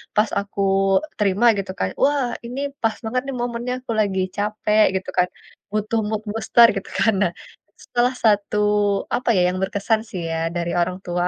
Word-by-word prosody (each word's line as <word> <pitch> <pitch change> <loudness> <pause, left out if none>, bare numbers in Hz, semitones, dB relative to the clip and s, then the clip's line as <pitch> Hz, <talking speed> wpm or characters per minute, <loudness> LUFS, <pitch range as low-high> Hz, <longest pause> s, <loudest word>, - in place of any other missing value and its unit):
pas 210 +1 +3
aku 200 0 -5 0.6
terima 205 +2 +2
gitu 195 -1 -3
kan, 95 - 0
"Wah, 280 -2 +2 0.2
ini 245 +3 -5 0.2
pas 225 -1 +1
banget 240 +3 -1
nih 275 - -4
momennya 240 +1 -3
aku 245 - -5
lagi 195 -3 +1
capek," 210 +1 +2
gitu 190 - -3
kan, 180 0 +4 0.4
"butuh 215 +2 0
mood 215 0 -2
booster," 230 +2 +5
gitu, 195 - -5
kan. 225 - +4
Nah, 175 - +1 0.5
setelah 245 +1 +1
satu, 210 -1 +2 0.6
apa 250 - -2
ya, 185 - +3
yang 185 - -4
berkesan 200 +3 0
sih 180 - -5
ya, 165 - -1 0.2
dari 170 0 -2
orang 180 +2 -1
tua. 175 0 0
210 Hz, 175 wpm, -22 LUFS, 190-235 Hz, 0.6 s, booster